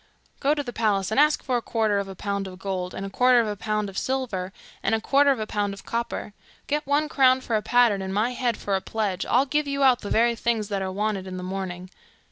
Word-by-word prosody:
'Go 290 Hz, +2 st, +2 dB
to 290 Hz, -, -2 dB
the 245 Hz, -3 st, -7 dB
palace 210 Hz, -3 st, 0 dB
and 220 Hz, -, +2 dB
ask 300 Hz, +1 st, +4 dB
for 255 Hz, -3 st, 0 dB
a -, -, -2 dB
quarter 220 Hz, -3 st, 0 dB
of 200 Hz, -, -3 dB
a 195 Hz, -, -8 dB
pound 200 Hz, +1 st, -3 dB
of 185 Hz, -1 st, -9 dB
gold, 185 Hz, -2 st, -4 dB
a 195 Hz, +1 st, -5 dB
quarter 250 Hz, +3 st, +4 dB
of 230 Hz, -, +2 dB
a 210 Hz, -, -2 dB
pound 210 Hz, +1 st, -2 dB
of 195 Hz, -1 st, -4 dB
silver, 235 Hz, -9 st, -2 dB, 0.3 s
and -, -, +1 dB
a -, -, -1 dB
quarter 280 Hz, +5 st, +3 dB
of 270 Hz, -4 st, +2 dB
a 215 Hz, -, -2 dB
pound 205 Hz, -2 st, -2 dB
of -, -, -14 dB
copper. 230 Hz, -2 st, -3 dB, 0.3 s
Get 295 Hz, 0 st, -2 dB
one 290 Hz, +2 st, +2 dB
crown 260 Hz, -3 st, +4 dB
for 230 Hz, -, -2 dB
a 215 Hz, -, +1 dB
pattern, 235 Hz, -4 st, +3 dB
and 190 Hz, 0 st, -4 dB
my 215 Hz, +5 st, +1 dB
head 245 Hz, -2 st, -1 dB
for 200 Hz, -, -1 dB
a 190 Hz, -, -1 dB
pledge, 200 Hz, -4 st, -2 dB
I'll 255 Hz, +3 st, +3 dB
give 295 Hz, +1 st, 0 dB
you 280 Hz, 0 st, 0 dB
out 255 Hz, -2 st, +5 dB
the 205 Hz, -, -6 dB
very 235 Hz, +1 st, +3 dB
things 225 Hz, -2 st, -1 dB
that 200 Hz, -2 st, -1 dB
are 190 Hz, 0 st, -2 dB
wanted 200 Hz, -1 st, -2 dB
in 185 Hz, 0 st, -6 dB
the 180 Hz, -, -6 dB
morning. 185 Hz, -1 st, -5 dB
215 Hz, 265 wpm, -25 LUFS, 195-255 Hz, 0.3 s, out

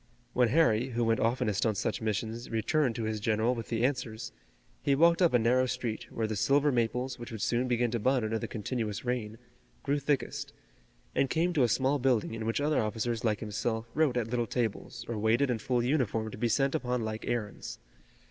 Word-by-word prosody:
When 125 Hz, -1 st, +4 dB
Harry, 125 Hz, -3 st, +3 dB
who 120 Hz, -1 st, -1 dB
went 115 Hz, 0 st, +2 dB
oftenest 115 Hz, -3 st, +1 dB
on 110 Hz, -2 st, +1 dB
such -, -, -2 dB
missions, 110 Hz, +2 st, -3 dB
returned 120 Hz, +3 st, +1 dB
to 115 Hz, -, -3 dB
his 110 Hz, 0 st, -2 dB
general 110 Hz, +2 st, +1 dB
with 115 Hz, -2 st, -5 dB
the 115 Hz, +1 st, +1 dB
answers, 120 Hz, -4 st, -2 dB, 0.5 s
he 140 Hz, -, +2 dB
walked 170 Hz, +4 st, +4 dB
up 175 Hz, -, +5 dB
a 125 Hz, -, +5 dB
narrow 125 Hz, +3 st, +3 dB
street, 115 Hz, -3 st, -3 dB
where 115 Hz, -, -1 dB
the 110 Hz, 0 st, -2 dB
silver 140 Hz, +7 st, +3 dB
maples, 125 Hz, +1 st, -1 dB
which 120 Hz, +1 st, -8 dB
would 110 Hz, -2 st, -4 dB
soon 120 Hz, +2 st, +1 dB
begin 120 Hz, -1 st, +1 dB
to 120 Hz, -, -1 dB
bud 130 Hz, +2 st, +2 dB
under 110 Hz, +1 st, -1 dB
the -, -, -4 dB
continuous 110 Hz, 0 st, -3 dB
rain, 115 Hz, -3 st, -2 dB, 0.5 s
grew 145 Hz, +1 st, +1 dB
thickest, 140 Hz, 0 st, -2 dB, 0.6 s
and 135 Hz, -, +2 dB
came 170 Hz, +2 st, +1 dB
to 150 Hz, -, +2 dB
a 125 Hz, -, +5 dB
small 135 Hz, +5 st, +1 dB
building 125 Hz, -4 st, +1 dB
in 110 Hz, -1 st, -4 dB
which 115 Hz, -, 0 dB
other 150 Hz, +1 st, +2 dB
officers 110 Hz, +2 st, -2 dB
like 110 Hz, -3 st, +1 dB
himself 110 Hz, +1 st, -3 dB
wrote 150 Hz, -6 st, +2 dB
at 115 Hz, -2 st, 0 dB
little 120 Hz, -2 st, 0 dB
tables 115 Hz, 0 st, -3 dB
or 115 Hz, -2 st, -3 dB
waited 120 Hz, +5 st, +2 dB
in 115 Hz, -, -1 dB
full 120 Hz, +2 st, 0 dB
uniform 115 Hz, -5 st, 0 dB
to -, -, -8 dB
be 120 Hz, -, +1 dB
sent 135 Hz, +4 st, +2 dB
upon 125 Hz, -2 st, -1 dB
like 110 Hz, 0 st, -5 dB
errands. 110 Hz, -4 st, -3 dB
120 Hz, 210 wpm, -30 LUFS, 110-130 Hz, 0.6 s, up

